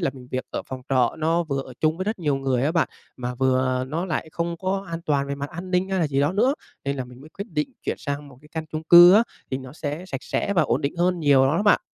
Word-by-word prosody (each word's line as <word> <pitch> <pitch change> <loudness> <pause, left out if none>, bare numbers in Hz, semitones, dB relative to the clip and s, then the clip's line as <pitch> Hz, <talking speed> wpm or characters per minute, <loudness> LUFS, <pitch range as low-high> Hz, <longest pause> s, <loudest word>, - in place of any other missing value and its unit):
là 170 - +1
mình 125 -2 -13
việc 130 0 -2
ở - - -3
phòng 130 -1 -5
trọ, 125 -3 +2
nó 165 +2 +2
vừa 140 -3 -2
ở 130 - -11
chung 155 +1 +2
với 185 - -3
rất 215 -1 -2
nhiều 150 -5 0
người 135 -2 0
á 155 - +1
bạn, 165 - +2 0.3
mà 125 0 -4
vừa 130 0 +1
nó 165 +6 -2
lại 160 -2 -3
không 170 0 -2
có 195 +3 -2
an 165 0 -4
toàn 140 -2 +1
về 140 - -3
mặt 140 +2 -5
an 175 +2 -7
ninh 180 +1 +1
hay 190 -1 0
là 160 - +2
gì 140 -1 0
đó 145 +5 +2
nữa, 245 +8 +3 0.3
nên 140 0 -1
là 130 - -3
mình 125 +1 -14
mới 155 - -13
quyết 200 +5 -7
định 150 -2 -2
chuyển - - -2
sang 140 0 -4
một 130 -2 -16
cái 150 - -17
căn 160 -1 -3
chung 155 0 -3
cư 175 +2 +9
á 220 - +7 0.3
thì 130 - -1
nó 130 -1 -10
sẽ 155 +3 -5
sạch 135 -7 -5
sẽ 200 - -1
và 175 -5 +3
ổn 125 -2 +1
định 140 +3 -2
hơn 175 0 +1
nhiều 140 -3 +5
lắm 145 +4 +1
á 200 - +1
bạn. 210 - +5
150 Hz, 300 wpm, -24 LUFS, 135-175 Hz, 0.3 s, cư